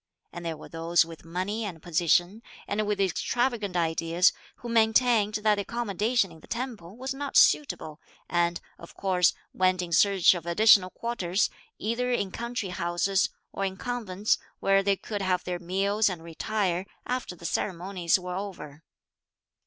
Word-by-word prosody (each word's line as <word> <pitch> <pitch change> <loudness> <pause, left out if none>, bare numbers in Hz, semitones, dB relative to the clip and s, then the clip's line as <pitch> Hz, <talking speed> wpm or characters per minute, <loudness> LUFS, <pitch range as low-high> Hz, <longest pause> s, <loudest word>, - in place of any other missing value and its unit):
And 175 - -7
there 165 -2 -3
were - - -11
those 165 +1 +2
with 165 -1 -11
money 185 +7 -3
and 185 -6 -5
position, 175 +5 +1 0.3
and 210 +1 -1
with 210 -1 -1
extravagant 210 +2 0
ideas, 165 +2 +2 0.2
who 240 - -10
maintained 220 -1 +3
that 215 -1 +5
the 205 - -1
accommodation 220 -1 0
in 160 - -14
the - - -17
temple 225 -6 -5
was 265 +2 -4
not 280 +1 -2
suitable, 160 - +3 0.3
and, 170 0 +1 0.2
of 170 - -13
course, 180 -2 +2 0.2
went 185 0 +2
in 170 - -7
search 195 +2 +5
of 170 -2 -6
additional 190 +1 +6
quarters, 195 -4 -1 0.3
either 240 +3 -1
in 200 -6 0
country 235 -3 -4
houses, 180 +2 0 0.2
or 195 - -3
in 190 -1 -2
convents, 215 -5 -1 0.2
where 195 0 +3
they 200 0 +2
could 205 +1 -5
have 185 -1 0
their 180 -1 -3
meals 200 +4 +1
and 175 -3 -6
retire, 185 +2 -2 0.2
after 250 -7 -3
the 170 - -12
ceremonies 180 -1 0
were 180 -1 -6
over. 180 -7 -7
190 Hz, 160 wpm, -27 LUFS, 175-215 Hz, 0.3 s, additional